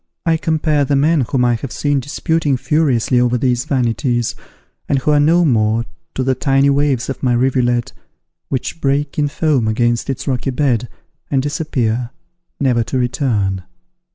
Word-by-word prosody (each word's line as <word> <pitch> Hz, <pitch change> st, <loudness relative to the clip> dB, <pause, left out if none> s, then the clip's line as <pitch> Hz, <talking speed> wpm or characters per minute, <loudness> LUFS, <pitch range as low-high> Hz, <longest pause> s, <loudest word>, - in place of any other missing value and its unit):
I 165 Hz, -1 st, +3 dB
compare 155 Hz, -2 st, +1 dB
the 140 Hz, +1 st, +1 dB
men 150 Hz, +2 st, +3 dB
whom 125 Hz, -2 st, +2 dB
I 120 Hz, -, +3 dB
have 120 Hz, +3 st, -4 dB
seen 145 Hz, -1 st, 0 dB
disputing 145 Hz, +1 st, -1 dB
furiously 130 Hz, -4 st, +1 dB
over 125 Hz, 0 st, +2 dB
these 125 Hz, -1 st, 0 dB
vanities, 120 Hz, -2 st, 0 dB, 0.6 s
and 140 Hz, -, +2 dB
who 135 Hz, +3 st, 0 dB
are 150 Hz, -, +4 dB
no 165 Hz, +4 st, +4 dB
more, 115 Hz, -3 st, +2 dB, 0.3 s
to 130 Hz, -, -1 dB
the 130 Hz, 0 st, +2 dB
tiny 135 Hz, +1 st, +2 dB
waves 140 Hz, -3 st, +1 dB
of 135 Hz, -, -5 dB
my 125 Hz, -2 st, +2 dB
rivulet, 120 Hz, -1 st, +1 dB, 0.6 s
which 135 Hz, +5 st, -3 dB
break 140 Hz, +2 st, 0 dB
in 145 Hz, -, +2 dB
foam 145 Hz, -5 st, 0 dB
against 120 Hz, +3 st, 0 dB
its 135 Hz, -, -4 dB
rocky 130 Hz, 0 st, -1 dB
bed, 125 Hz, -3 st, 0 dB, 0.4 s
and 135 Hz, -, +1 dB
disappear, 125 Hz, -6 st, -1 dB, 0.5 s
never 125 Hz, -4 st, +2 dB
to 130 Hz, -, -2 dB
return. 120 Hz, -7 st, 0 dB
130 Hz, 160 wpm, -17 LUFS, 120-145 Hz, 0.6 s, are